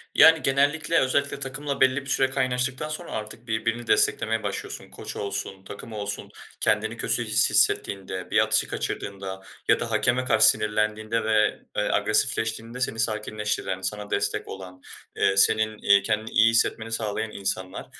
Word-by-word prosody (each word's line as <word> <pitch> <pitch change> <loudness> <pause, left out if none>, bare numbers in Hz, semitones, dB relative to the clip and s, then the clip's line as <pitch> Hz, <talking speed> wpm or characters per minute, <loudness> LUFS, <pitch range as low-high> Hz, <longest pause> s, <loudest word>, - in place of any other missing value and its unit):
Yani, 160 0 +7
genellikle, 145 +5 +2
özellikle 140 +2 0
takımla 140 +1 -4
belli 130 +1 +4
bir 135 - -10
süre 135 0 +2
kaynaştıktan 130 +2 -1
sonra 155 +3 -6
artık 110 +2 -7
birbirini 115 +1 -2
desteklemeye - - +2
başlıyorsun. - - -5
Koç - - -8
olsun, 100 -1 -4
takım 100 +3 -9
olsun, 100 -1 -5 0.3
kendini - - 0
kötü - - 0
his - - +2
hissettiğinde, 95 -2 0
bir - - +4
atışı - - +2
kaçırdığında 95 -1 -5 0.3
ya - - +4
da 115 - -4
hakeme 120 +4 +1
karşı 110 -3 +5
sinirlendiğinde 105 +1 0
ve, 110 -1 +2 0.2
eee, - - +2
agresifleştiğinde 115 +2 0
seni 115 -3 -2
sakinleştiren, 105 -3 -2
sana 105 +2 -4
destek 100 - -1
olan, 90 -1 -9 0.3
eee, 95 0 +2
senin, 110 +2 +3
eee, 100 -1 +4
kendini 110 +2 -1
iyi 115 +1 +5
hissetmeni 115 0 +1
sağlayan 110 -1 -2
insanlar. 95 -1 -4
110 Hz, 150 wpm, -25 LUFS, 100-130 Hz, 0.3 s, Yani